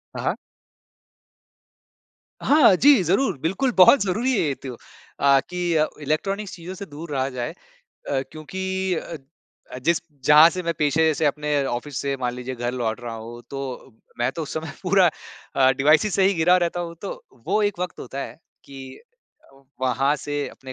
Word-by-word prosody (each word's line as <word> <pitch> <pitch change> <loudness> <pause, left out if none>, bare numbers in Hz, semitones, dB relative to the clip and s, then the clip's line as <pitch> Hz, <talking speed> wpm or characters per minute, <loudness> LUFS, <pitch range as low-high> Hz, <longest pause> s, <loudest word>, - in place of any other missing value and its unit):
हाँ, - - -5
हाँ। - - +1 2.1
हाँ, 280 -10 +6
जी, 280 -1 +6
ज़रूर 190 - +1
बिल्कुल 195 +11 0
बहुत 185 +9 +7
ज़रूरी 220 +8 0
है 230 - +1
ये 140 - -1
तो 130 - -5 0.5
अ, 140 -1 +5
कि 175 -2 -1
अ, 155 0 +3
इलेक्ट्रॉनिक्स 195 +7 -2
चीज़ों 175 +2 -8
से 200 - -7
दूर 150 +1 -9
रहा 135 -1 -1
जाए 125 -2 -4 0.4
अ, 135 -1 -4
क्योंकि 190 +4 -3
अ, 165 0 -5 0.7
जिस 170 +2 +2 0.2
जहाँ 150 +3 +8
से 185 -1 -4
मैं 170 0 -1
पेशे 155 +2 +3
से 160 - -1
अपने 145 -1 0
ऑफ़िस 130 +3 -4
से 140 -1 -2
मान 125 -2 -2
लीजिए 125 +1 -6
घर 120 0 -3
लौट 120 -2 -2
रहा 120 -1 -6
हूँ 115 +2 -9
तो, 135 -3 -7 0.2
मैं 120 +2 +1
तो 165 - -5
उस 150 - -6
समय 160 -1 -4
पूरा 185 -2 +4 0.5
अ, 130 -1 +5
डिवाइसेस 155 +8 +3
से 195 - +3
ही 195 - +2
गिरा 175 +2 +4
रहता 175 0 -1
हूँ 170 -1 -5
तो, - - -7 0.2
वो 215 - +1
एक 205 -3 0
वक़्त 180 -1 -4
होता 135 +2 -7
है - - -9 0.3
कि 135 -1 -10 0.5
अ, 135 0 -22 0.2
वहाँ 130 +3 +1
से 145 0 -3
अपने 130 -1 -11
155 Hz, 180 wpm, -23 LUFS, 135-185 Hz, 2.1 s, जहाँ